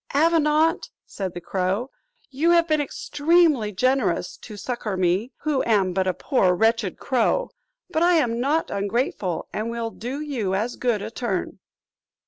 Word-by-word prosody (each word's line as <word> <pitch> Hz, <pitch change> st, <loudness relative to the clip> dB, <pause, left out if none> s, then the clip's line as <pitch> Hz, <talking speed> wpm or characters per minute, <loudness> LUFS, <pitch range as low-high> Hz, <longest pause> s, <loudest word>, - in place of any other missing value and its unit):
"Avenant," 320 Hz, +1 st, +3 dB, 0.2 s
said 190 Hz, -3 st, -5 dB
the 175 Hz, -, -5 dB
crow, 190 Hz, +8 st, -2 dB, 0.4 s
"you 295 Hz, +6 st, +1 dB
have 340 Hz, -1 st, +4 dB
been 310 Hz, -2 st, +2 dB
extremely 295 Hz, -5 st, +2 dB
generous 250 Hz, -5 st, 0 dB
to 210 Hz, -3 st, -11 dB
succour 215 Hz, -3 st, -4 dB
me, 185 Hz, +7 st, +1 dB
who 295 Hz, -3 st, 0 dB
am 195 Hz, -5 st, +2 dB
but 190 Hz, 0 st, 0 dB
a 185 Hz, -, +2 dB
poor 185 Hz, -9 st, +2 dB
wretched 225 Hz, -1 st, +1 dB
crow; 260 Hz, -, 0 dB, 0.4 s
but 325 Hz, -3 st, -1 dB
I 350 Hz, +1 st, +5 dB
am 235 Hz, -7 st, +1 dB
not 295 Hz, +6 st, 0 dB
ungrateful 200 Hz, -, -2 dB
and 215 Hz, +2 st, -2 dB
will 230 Hz, -1 st, -3 dB
do 250 Hz, +6 st, -5 dB
you 245 Hz, -11 st, -2 dB
as 225 Hz, +5 st, -2 dB
good 235 Hz, -5 st, 0 dB
a -, -, -6 dB
turn." 230 Hz, -6 st, -3 dB
235 Hz, 155 wpm, -24 LUFS, 200-295 Hz, 0.4 s, I